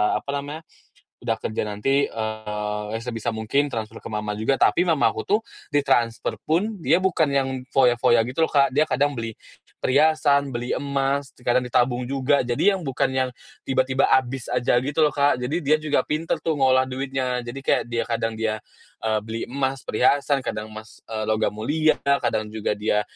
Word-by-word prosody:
apa - - -4
namanya, 145 +3 -7 0.6
udah 115 -2 -1
kerja 110 0 -3
nanti, 135 +7 +1
eee, 105 0 -4
sebisa 115 -1 -3
mungkin 110 +6 +1
transfer 115 -4 -5
ke - - -15
mama 105 -1 -3
juga. 110 +5 +1
Tapi 175 +6 +3
mamaku 160 -5 +2
tuh 210 +2 +2 0.3
ditransfer 120 -5 +1
pun 195 +7 0
dia 175 +1 +2
bukan 180 -4 +2
yang 135 -1 +2 0.3
foya-foya 120 -3 +4
gitu 130 +8 0
loh - - -13
Kak, 140 -2 +4
dia 150 +4 +2
kadang 145 -2 0
beli 115 -1 -4 0.5
perhiasan, 140 0 +3
beli 120 +1 -3
emas, 140 0 -1
kadang 125 0 +1
ditabung 125 0 +1
juga, 135 +2 +1
jadi 125 +12 +2
yang 190 - -4
bukan 135 -2 -1
yang 130 -1 +1 0.3
tiba-tiba 130 0 +1
habis 130 -1 +1
aja 120 - +1
gitu 145 +4 0
loh, 150 - -2
Kak. 140 -2 +3
Jadi 140 +8 -2
dia 155 +2 +3
juga 155 -1 +1
pinter 155 +2 -1
tuh 160 - 0
ngolah 130 -1 +4
duitnya 130 -1 -2
jadi 125 +3 -6
kayak - - +2
dia 115 -1 0
kadang 115 -1 -1
dia, 110 -1 -1 0.5
eee, 110 -1 +2
beli 110 +1 -5
emas 135 -1 -2
perhiasan, 140 +5 +2
kadang 105 -3 -4
emas, 110 0 -11
eee, 110 -1 -4
logam 110 0 +1
mulia 155 +9 +2
lah, 140 0 +4
kadang 110 -3 0
juga 110 -1 -2
dia 105 0 +1
130 Hz, 175 wpm, -23 LUFS, 115-140 Hz, 0.6 s, foya-foya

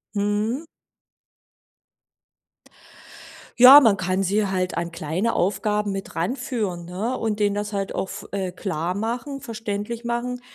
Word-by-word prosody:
Mhm. 210 +8 -1 2.9
Ja, 255 +4 +11
man 225 -8 +4
kann 185 0 -1
sie 200 +2 +1
halt 185 -2 -1
an 170 0 -3
kleine 165 +8 -2
Aufgaben 210 +2 0
mit 195 0 -6
ranführen, 210 -2 -2
ne, 200 +9 -3
und 220 -3 -2
denen 205 -1 +2
das 205 0 -3
halt 195 -1 -3
auch 190 - -2
f - - -8
äh, 190 -2 -2
klarmachen, 210 - -3
verständlich 225 -1 -5
machen, 240 +1 -3
205 Hz, 125 wpm, -23 LUFS, 190-235 Hz, 2.9 s, Ja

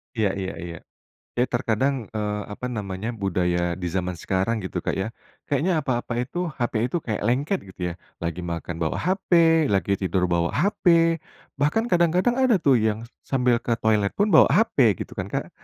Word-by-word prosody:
Iya 110 -3 +2
iya 95 0 -3
iya. 85 -1 -6 0.6
Ya 120 - +2
terkadang, 125 +1 0
eee, 105 -1 -2
apa 125 +4 -6
namanya, 105 0 -4
budaya 90 -5 0
di 90 -1 -4
zaman 90 0 -2
sekarang 95 +5 -1
gitu, 95 -1 -4
Kak, - - -2
ya. 95 +4 -2 0.4
Kayaknya 155 +3 +1
apa-apa 120 -2 -2
itu, 175 +8 -3
HP 120 -5 -1
itu 125 - -2
kayak 110 -3 -3
lengket 140 - +1 0.2
gitu - - -18
ya. - - -6 0.3
Lagi 85 0 -3
makan 85 -1 -4
bawa 80 -2 -1
HP, 170 -3 +3
lagi 100 -3 +1
tidur 95 -1 0
bawa 85 0 +1
HP, 170 -3 +3 0.4
bahkan 225 +12 +1
kadang-kadang 180 +8 +3
ada 260 -3 +4
tuh 135 -4 +5
yang 110 0 0
s 115 - -12 0.2
sambil 125 -3 +2
ke 115 - -1
toilet 105 -2 +2
pun 205 +1 +1
bawa 160 - +7
HP 130 - +3
gitu - - -12
kan, - - -2
Kak. - - -4
115 Hz, 180 wpm, -24 LUFS, 95-155 Hz, 0.6 s, bawa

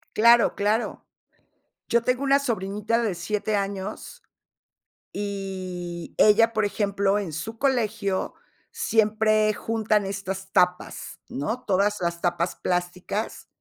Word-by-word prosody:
Claro, 235 +1 +6
claro. 210 +3 -1 0.8
Yo 235 0 +2
tengo 250 +2 +1
una 275 0 +4
sobrinita 220 -2 -1
de 205 -6 -1
7 210 +4 -1
años, 200 - -4 0.9
y 185 -4 -5
ella, 225 +2 +5
por 215 -1 +2
ejemplo, 200 -1 +1
en 185 -7 -4
su 220 +9 -5
colegio 220 -7 0 0.4
siempre 215 -1 +2
juntan 215 -1 0
estas 195 -1 -5
tapas, 180 0 0
¿no? 220 - -3
Todas 205 +1 +2
las 170 -1 -2
tapas 175 0 0
plásticas 180 +4 -3
205 Hz, 110 wpm, -25 LUFS, 190-220 Hz, 0.9 s, Claro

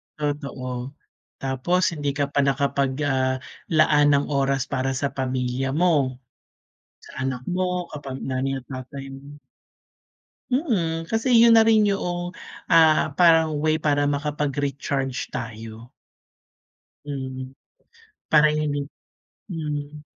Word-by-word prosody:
Totoo, 140 -3 -4 0.5
tapos 135 +7 0
hindi 145 -3 -3
ka 140 -1 -1
pa 145 - 0
nakapag 140 0 +1
ah, 130 -2 +1 0.4
laan 150 -1 +5
ng 140 - +1
oras 135 -1 +1
para 135 -1 -1
sa 140 +2 -1
pamilya 130 0 -2
mo. 150 -6 +2 0.9
Sa 130 - -7
anak 130 -2 -2
mo 180 -1 -1
kapag 135 -3 -7
nanay 135 +1 -2
at - - -26
tatay 135 +1 -7
mo 140 +2 -11 1.2
Mm, 170 - 0
kasi 225 +3 0
'yun 230 -1 +7
na 225 - +7
rin 220 -2 +4
yuong, 175 -2 -2 0.3
ah, 160 -3 +4
parang 165 -3 +5
way 155 0 +2
para 145 -1 +2
makapag-recharge 140 -2 -2
tayo. 115 0 -7 1.2
Mm, 130 -2 -5 0.8
para 150 0 +5
hindi 145 -2 -1 0.6
mm. 150 -3 -5
145 Hz, 115 wpm, -24 LUFS, 135-160 Hz, 1.2 s, yun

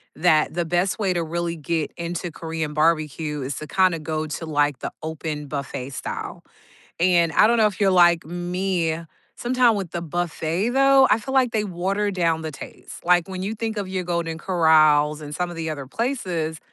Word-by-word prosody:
that 155 -1 +3
the 175 0 -1
best 175 +5 0
way 190 -3 +1
to 170 -1 -1
really 170 +1 -3
get 160 0 -2
into 170 0 -4
Korean 160 -2 -4
barbecue 155 -1 0
is 130 0 -4
to 155 - -7
kinda 185 -2 +2
go 155 0 -3
to, 165 +2 -5
like, 145 -2 +1
the - - -4
open 155 -2 -4
buffet 140 -2 -5
style, - - -6 0.6
and 170 -2 +3
I - - +6
don't 235 - +3
know 220 -1 +5
if 205 0 -3
you're 195 -1 +4
like 175 -3 +5
me, 175 -1 -2 0.4
sometime 245 -2 +3
with 190 -5 -4
the 170 - -4
buffet, 175 +4 -2
though, 270 0 +5
I 220 - +5
feel 265 +5 -6
like 255 -3 +4
they 215 -1 0
water 195 +3 -1
down 165 -3 0
the 155 -1 -5
taste. - - -11
Like, 175 0 +3
when 185 -1 -5
you 210 +3 -3
think 225 0 -3
of 200 -2 -3
your 185 -1 -3
Golden 170 -2 -2
Corrals 155 -4 +4
and 150 0 -7
some 180 -1 -2
of 170 - -8
the 160 -1 -3
other 140 -3 -5
places, 180 - -2
170 Hz, 195 wpm, -23 LUFS, 155-190 Hz, 0.6 s, I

